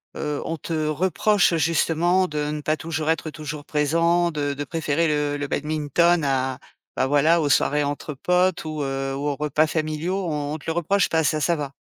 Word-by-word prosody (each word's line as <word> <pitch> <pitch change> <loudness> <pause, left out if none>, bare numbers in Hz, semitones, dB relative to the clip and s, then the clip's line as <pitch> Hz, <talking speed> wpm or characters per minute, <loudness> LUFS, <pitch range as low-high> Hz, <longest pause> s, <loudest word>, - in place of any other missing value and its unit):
heu, 150 -1 -3
on 165 - -2
te 155 0 -2
reproche 185 +4 +2
justement 165 +3 +2
de 150 0 -2
ne 150 0 -4
pas 155 +2 0
toujours 160 -1 -3
être 160 -1 0
toujours 150 -1 -7
présent, 165 +4 +2
de 145 -2 -2
de 145 - -4
préférer 160 +1 0
le 150 -1 0
le 145 0 -3
badminton 155 +3 +1
à, 130 -1 0 0.4
bah, 130 - +1
voilà 155 +4 +3
aux 145 - 0
soirées 145 +1 +2
entre 145 +1 -4
potes 180 +5 +1
ou, 155 -1 -4
heu, 135 0 -2
ou 140 +2 -3
aux 145 - 0
repas 150 +1 +1
familiaux, 160 +5 -2
on 150 -2 -2
on - - -3
te 150 - -17
le - - +1
reproche 185 +4 +1
pas 160 -1 +2
ça, 155 +2 +1
ça 170 +2 +2
va? 140 -2 -5
155 Hz, 200 wpm, -23 LUFS, 145-165 Hz, 0.4 s, voilà